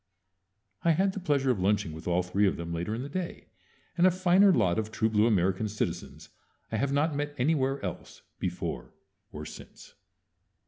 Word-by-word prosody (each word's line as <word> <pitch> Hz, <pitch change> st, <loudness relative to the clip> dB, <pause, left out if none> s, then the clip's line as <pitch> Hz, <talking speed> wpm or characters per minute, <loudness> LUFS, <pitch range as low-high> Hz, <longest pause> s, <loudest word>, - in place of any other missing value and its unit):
I 170 Hz, -, +4 dB
had 190 Hz, +4 st, +1 dB
the 195 Hz, -, -4 dB
pleasure 145 Hz, -7 st, +1 dB
of 115 Hz, -, -1 dB
lunching 95 Hz, -4 st, +1 dB
with 80 Hz, +2 st, -9 dB
all 90 Hz, +1 st, +2 dB
three 100 Hz, +3 st, +2 dB
of -, -, 0 dB
them 85 Hz, 0 st, -5 dB
later 85 Hz, +6 st, -2 dB
in 120 Hz, -, -4 dB
the -, -, -5 dB
day, 175 Hz, +4 st, -5 dB, 0.5 s
and 175 Hz, +1 st, +5 dB
a -, -, +7 dB
finer 185 Hz, +2 st, +5 dB
lot 90 Hz, -, +2 dB
of 110 Hz, -1 st, -3 dB
true 110 Hz, 0 st, 0 dB
blue 105 Hz, +1 st, +4 dB
American 95 Hz, 0 st, +1 dB
citizens 105 Hz, -, -4 dB, 0.4 s
I -, -, 0 dB
have 140 Hz, +1 st, 0 dB
not 145 Hz, +2 st, +1 dB
met 145 Hz, 0 st, -3 dB
anywhere 135 Hz, 0 st, +1 dB
else, 90 Hz, -, -7 dB, 0.2 s
before -, -, -4 dB, 0.4 s
or 75 Hz, 0 st, -7 dB
since. -, -, -12 dB
125 Hz, 185 wpm, -29 LUFS, 95-155 Hz, 0.5 s, a